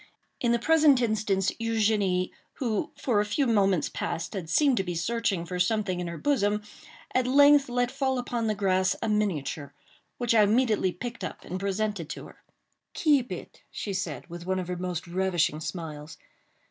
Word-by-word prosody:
In 240 - +1
the 235 - +4
present 300 +1 +5
instance, 210 -4 +1
Eugénie, 210 -5 +1 0.2
who 225 -6 -2
for 225 -6 +1
a - - +1
few 210 +7 0
moments 195 -7 +2
past 165 0 -4
had 180 -6 -5
seemed 275 - +3
to 195 - +1
be 175 -2 -4
searching 195 0 -1
for 180 +1 -4
something 185 0 +1
in 175 - -3
her 170 -1 -5
bosom, 210 - +1 0.5
at 255 -1 +2
length 285 +1 +6
let 245 0 0
fall 265 -1 0
upon 240 -2 -2
the 215 - 0
grass 185 -2 +2
a - - 0
miniature, 160 -9 -1 0.4
which 240 -2 +1
I 220 - +6
immediately 215 -2 +3
picked 235 +6 -7
up - - -6
and 185 - -4
presented 200 -3 -2
to - - -6
her. - - -15 0.5
"Keep 285 -6 +2
it!" - - -8
she 200 - -5
said, 190 +2 -4
with 175 0 -9
one 190 0 0
of 180 -1 -4
her 180 - -2
most 180 -2 -3
ravishing 175 -3 0
smiles. 155 -2 -6
205 Hz, 180 wpm, -27 LUFS, 180-235 Hz, 0.5 s, length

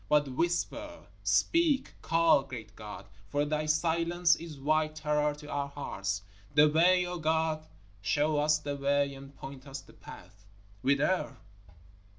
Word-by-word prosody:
But 145 -2 +3
whisper 175 - -2 0.2
speak 325 -5 +2
call, 165 -3 +4
great 115 -5 -9
God, 105 -1 -9 0.2
for 145 0 +1
Thy 155 +1 -1
silence 170 +2 +2
is 165 -3 -9
white 155 +2 +1
terror 150 -1 0
to 150 0 -12
our 145 -1 -2
hearts! 100 -9 -4 0.3
The 150 0 +7
way, 180 +4 +4
O 175 0 -4
God, 160 0 0 0.3
show 145 +9 +1
us 150 +1 +3
the 145 -1 -4
way 140 0 +1
and 135 +1 -12
point 135 0 -9
us 135 0 -6
the - - -18
path. 100 +3 -13 0.4
Whither? 140 +2 +1
150 Hz, 145 wpm, -30 LUFS, 140-165 Hz, 0.4 s, The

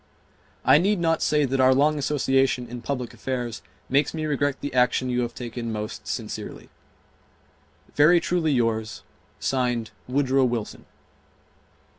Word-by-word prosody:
I 150 - +7
need 200 +3 +1
not 165 -1 +1
say 150 -1 +2
that 135 0 -1
our 130 0 +5
long 150 +2 +3
association 135 -3 +1
in 120 +1 -7
public 125 -2 -4
affairs 125 -3 -4 0.3
makes 140 +4 +1
me 155 -1 -2
regret 145 -2 0
the 145 - -5
action 125 0 +2
you 125 0 +1
have 120 -1 -4
taken 120 -1 -5
most 105 0 -5
sincerely. - - -6 1.2
Very 160 +4 +5
truly 170 -3 0
yours, 115 -4 -1 0.4
(Signed) 125 -4 -1 0.2
WOODROW 135 0 +2
WILSON. 120 -3 -3
130 Hz, 135 wpm, -24 LUFS, 120-145 Hz, 1.2 s, I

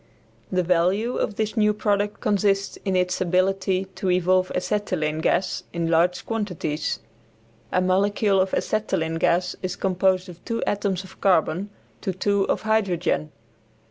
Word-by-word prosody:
The 185 -1 +1
value 185 +7 +1
of 210 - -1
this 215 +1 -2
new 210 -2 +3
product 205 -1 0
consists 200 -1 +1
in 190 -1 0
its 180 0 0
ability 185 +1 +1
to 190 0 -2
evolve 185 +1 +2
Acetylene 180 -6 -1
gas 185 +3 0
in 170 -1 -1
large 175 +2 +2
quantities. 180 -9 -2 0.7
A 185 - +2
molecule 195 +2 +2
of 190 0 0
acetylene 170 -7 -1
gas 180 +2 +1
is 185 0 -3
composed 185 0 +1
of 175 -2 -12
two 230 -1 -2
atoms 200 -2 -1
of 190 - -15
carbon 185 +1 +2 0.3
to 190 - -2
two 200 +2 +1
of - - -1
hydrogen. 185 -8 0
185 Hz, 140 wpm, -24 LUFS, 180-205 Hz, 0.7 s, new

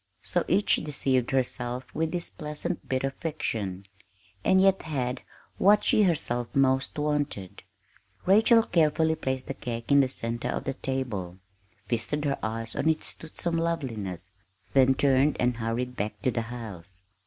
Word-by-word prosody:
So 175 - 0
each 205 - +3
deceived 135 -4 0
herself 125 -1 -2
with 160 0 -1
this 175 -1 -1
pleasant 150 +3 -4
bit 130 0 0
of 135 0 -1
fiction, 105 - -3 0.6
and 190 - +4
yet 195 0 +4
had 130 -5 -2 0.4
what 205 +2 +5
she - - +4
herself 130 - +1
most 135 0 +2
wanted. 145 -10 -2 0.6
Rachel 225 +4 +6
carefully 160 -3 +2
placed 130 -4 -3
the - - -4
cake 120 -1 -5
in 140 - +7
the 135 - +4
center 120 0 -3
of - - -2
the 135 - -2
table, 120 -10 -3 0.5
feasted 135 +6 -2
her 140 -1 0
eyes 115 +1 -3
on 160 - +1
its 160 - -1
toothsome 165 +1 -3
loveliness, 115 - -3 0.4
then 135 -1 +5
turned 135 +2 +3
and 125 -1 +1
hurried 120 +2 -2
back 105 0 -3
to 130 - +2
the 115 - -1
house. 100 -6 -9
130 Hz, 155 wpm, -27 LUFS, 115-155 Hz, 0.6 s, in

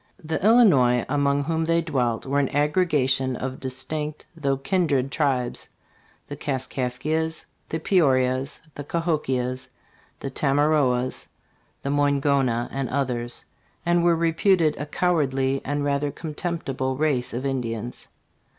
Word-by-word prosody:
The 160 +2 -3
Illinois 150 - +5
among 140 0 +1
whom 160 +2 0
they 165 +1 +2
dwelt 125 -8 -1
were 140 +1 +1
an 140 - +1
aggregation 145 -4 +1
of 130 +1 -4
distinct 150 +3 -3
though 140 -4 0
kindred 140 -3 +1
tribes 135 -6 0 0.6
the 145 - -6
Kaskaskias, 140 +3 -2 0.2
the 160 - -1
Peorias, 130 -7 +2
the 145 - -6
Kahokias, 135 -6 -1 0.5
the 135 - -5
Tama 145 +2 +2
roas, 130 -5 +1 0.6
the 140 - -2
"Moingona 140 -4 +2
and 135 -2 -2
others,* 125 -3 -2 0.4
and 175 0 +3
were 170 -1 +4
reputed 165 0 +2
a 145 - -5
cowardly 135 -6 +1
and 145 +1 -2
rather 145 0 0
contemptible 145 -5 -3
race 145 -5 0
of 125 +3 -4
Indians. 120 -3 -3
140 Hz, 125 wpm, -24 LUFS, 130-155 Hz, 0.6 s, Illinois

